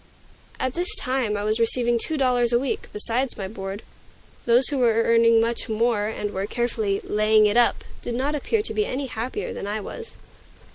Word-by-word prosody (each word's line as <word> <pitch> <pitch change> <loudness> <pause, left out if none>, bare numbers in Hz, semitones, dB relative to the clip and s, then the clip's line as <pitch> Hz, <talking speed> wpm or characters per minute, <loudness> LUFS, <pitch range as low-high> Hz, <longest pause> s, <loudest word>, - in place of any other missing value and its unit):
At 260 -1 -1
this 360 +6 0
time 255 - -1
I 205 - -3
was 215 +2 +1
receiving 235 +1 +2
two 315 +6 -1
dollars 250 -3 +2
a 240 - +4
week, 265 +2 -3
besides 235 +4 0
my 195 - -4
board. 195 0 -7 0.6
Those 240 +2 +5
who 285 -2 -2
were 230 -2 +3
earning 230 0 +4
much 230 +1 -1
more, 220 -1 +1
and 210 -1 -4
were 195 +1 -3
carefully 220 -4 -1
"laying 215 0 +3
it 210 +1 +1
up," 240 0 +3 0.2
did 240 - -4
not 275 +4 -1
appear 415 - -1
to - - -3
be 425 - +1
any 275 +2 -3
happier 240 0 -5
than - - -6
I 210 +1 -2
was. 460 - -9
235 Hz, 195 wpm, -23 LUFS, 215-255 Hz, 0.6 s, Those